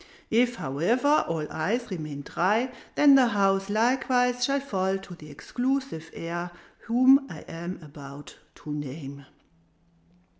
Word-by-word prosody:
If, 240 Hz, +2 st, +3 dB
however, 230 Hz, -, +2 dB
all 160 Hz, -2 st, -2 dB
eyes 215 Hz, +9 st, -2 dB
remain 155 Hz, -5 st, -5 dB
dry, 215 Hz, -, +1 dB, 0.2 s
then 290 Hz, -1 st, +7 dB
the 265 Hz, -2 st, +6 dB
house 195 Hz, -3 st, +1 dB
likewise 245 Hz, +2 st, +2 dB
shall 275 Hz, +2 st, +2 dB
fall 195 Hz, -8 st, -1 dB
to 195 Hz, -1 st, -11 dB
the 155 Hz, -3 st, -12 dB
exclusive 245 Hz, -, -3 dB
heir 175 Hz, +1 st, -4 dB, 0.4 s
whom 260 Hz, +4 st, +5 dB
I -, -, -8 dB
am 170 Hz, +3 st, -7 dB
about 145 Hz, -1 st, -11 dB, 0.2 s
to 150 Hz, -, -7 dB
name." 140 Hz, -1 st, -7 dB
195 Hz, 125 wpm, -26 LUFS, 155-250 Hz, 0.4 s, then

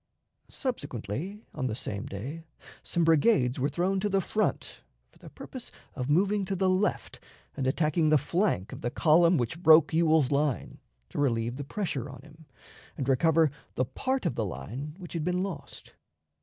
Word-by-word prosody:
Subsequently, 165 Hz, -, -4 dB
on 130 Hz, -, -2 dB
the 110 Hz, -, -2 dB
same 105 Hz, -3 st, -4 dB
day, 135 Hz, +12 st, -6 dB, 0.4 s
some 170 Hz, -, 0 dB
brigades 155 Hz, -, +3 dB
were 140 Hz, +3 st, +1 dB
thrown 190 Hz, +2 st, 0 dB
to 205 Hz, +2 st, 0 dB
the 195 Hz, -1 st, +2 dB
front, 215 Hz, +3 st, -2 dB, 0.3 s
for -, -, -23 dB
the -, -, -12 dB
purpose 255 Hz, -2 st, -9 dB, 0.2 s
of 130 Hz, -1 st, -4 dB
moving 195 Hz, +6 st, +2 dB
to 195 Hz, +1 st, -2 dB
the 190 Hz, 0 st, +2 dB
left 185 Hz, +3 st, -1 dB, 0.4 s
and 135 Hz, -2 st, -1 dB
attacking 155 Hz, +3 st, +2 dB
the 155 Hz, -, +6 dB
flank 145 Hz, -, 0 dB
of -, -, -8 dB
the 120 Hz, -, -1 dB
column 165 Hz, +5 st, +4 dB
which 125 Hz, +7 st, -2 dB
broke 160 Hz, -2 st, +6 dB
Ewell's 160 Hz, -4 st, +3 dB
line, 140 Hz, -3 st, -1 dB, 0.3 s
to -, -, -5 dB
relieve 120 Hz, -3 st, 0 dB
the 145 Hz, -, -4 dB
pressure 145 Hz, -, -3 dB
on 130 Hz, -1 st, -11 dB
him, 155 Hz, 0 st, -17 dB, 0.5 s
and 135 Hz, -, -3 dB
recover 160 Hz, +3 st, +3 dB, 0.2 s
the 130 Hz, -, +1 dB
part 260 Hz, -, -2 dB
of 170 Hz, -, +1 dB
the 115 Hz, -, -1 dB
line 130 Hz, -, -6 dB
which 180 Hz, -3 st, -9 dB
had 165 Hz, -3 st, -2 dB
been 180 Hz, +2 st, 0 dB
lost. 160 Hz, -8 st, -8 dB
155 Hz, 175 wpm, -28 LUFS, 130-180 Hz, 0.5 s, the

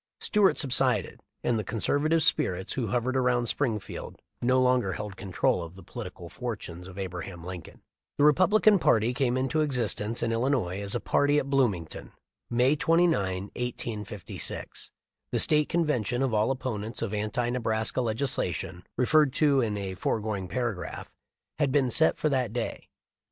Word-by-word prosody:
Stuart 210 Hz, -3 st, +3 dB
subsided, 130 Hz, -, +1 dB, 0.2 s
and 115 Hz, -2 st, +1 dB
the -, -, -2 dB
con 110 Hz, +4 st, -5 dB
servative 155 Hz, +7 st, +2 dB
spirits 95 Hz, -, +1 dB
who 125 Hz, -4 st, -2 dB
hovered 125 Hz, +4 st, -1 dB
around 125 Hz, -2 st, +2 dB
Springfield 115 Hz, -4 st, -3 dB, 0.2 s
no 125 Hz, +2 st, +3 dB
longer 125 Hz, -6 st, +2 dB
held 105 Hz, 0 st, -6 dB
control 95 Hz, -2 st, 0 dB
of 85 Hz, +1 st, -8 dB
the 95 Hz, -, -12 dB
political -, -, -8 dB
fortunes 90 Hz, +2 st, -6 dB
of 95 Hz, 0 st, -11 dB
Abraham 90 Hz, -2 st, -6 dB
Lincoln. 90 Hz, -1 st, -9 dB, 0.3 s
The 145 Hz, -, +3 dB
Republican 185 Hz, +7 st, +5 dB
party 115 Hz, -4 st, +3 dB
came 125 Hz, -1 st, +1 dB
into 135 Hz, +4 st, 0 dB
existence 120 Hz, -5 st, 0 dB
in 115 Hz, -, 0 dB
Illinois 115 Hz, -6 st, 0 dB
as 100 Hz, 0 st, -3 dB
a -, -, +1 dB
party 145 Hz, +1 st, +2 dB
at 140 Hz, -1 st, -1 dB
Bloomington, 105 Hz, -, -1 dB, 0.4 s
May 125 Hz, +4 st, +3 dB
29, 155 Hz, -, +2 dB
1856. 110 Hz, -4 st, -4 dB, 0.4 s
The -, -, -1 dB
State 150 Hz, -1 st, +4 dB
convention 130 Hz, -, 0 dB
of 130 Hz, -4 st, 0 dB
all 110 Hz, +2 st, +2 dB
opponents 120 Hz, -5 st, -3 dB
of 110 Hz, -2 st, -3 dB
anti 115 Hz, +4 st, -1 dB
Nebraska 115 Hz, 0 st, 0 dB
legislation, 110 Hz, -, -1 dB
referred 150 Hz, +2 st, +4 dB
to 145 Hz, -3 st, +3 dB
in 105 Hz, -3 st, -1 dB
a 95 Hz, -2 st, -4 dB
foregoing 105 Hz, 0 st, -2 dB
para 120 Hz, +1 st, -1 dB
graph, 90 Hz, -, -8 dB, 0.5 s
had 145 Hz, -3 st, +2 dB
been 130 Hz, -3 st, +2 dB
set 160 Hz, +4 st, +3 dB
for -, -, 0 dB
that 130 Hz, -6 st, 0 dB
day. 120 Hz, -2 st, -4 dB
120 Hz, 155 wpm, -28 LUFS, 105-135 Hz, 0.5 s, Republican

